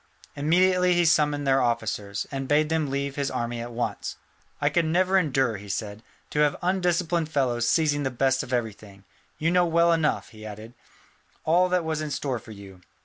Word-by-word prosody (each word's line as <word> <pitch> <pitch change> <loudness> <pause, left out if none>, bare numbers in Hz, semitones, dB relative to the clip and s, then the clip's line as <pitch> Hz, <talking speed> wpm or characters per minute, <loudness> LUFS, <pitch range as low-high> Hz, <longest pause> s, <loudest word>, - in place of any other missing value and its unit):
Immediately 180 +4 +3
he 175 0 +3
summoned 150 -3 +2
their 135 0 +3
officers, 110 -4 -2
and 135 -1 -4
bade 150 +2 +2
them 160 -3 0
leave 140 +1 -3
his 140 -1 -1
army 120 0 -3
at 120 +1 -6
once. 120 +1 -3 0.4
"I 145 - +1
could 165 +3 +2
never 185 +4 +2
endure," 135 - +2
he 100 +1 -11
said, 105 +1 -4 0.3
"to 150 - -1
have 150 -1 +3
undisciplined 175 -3 0
fellows 125 -6 0
seizing 150 -4 +2
the 135 - 0
best 130 +1 +1
of - - -8
everything. 105 -5 -4 0.3
You 160 +2 0
know 180 0 +3
well 170 +1 +3
enough," 160 -2 0
he 110 -2 -13
added, 110 +2 -9 0.7
"all 180 +3 +3
that 180 -2 +1
was 160 -1 -2
in 155 - -3
store 130 -3 -2
for 110 - -16
you. 100 -3 -12
145 Hz, 190 wpm, -25 LUFS, 120-165 Hz, 0.7 s, Immediately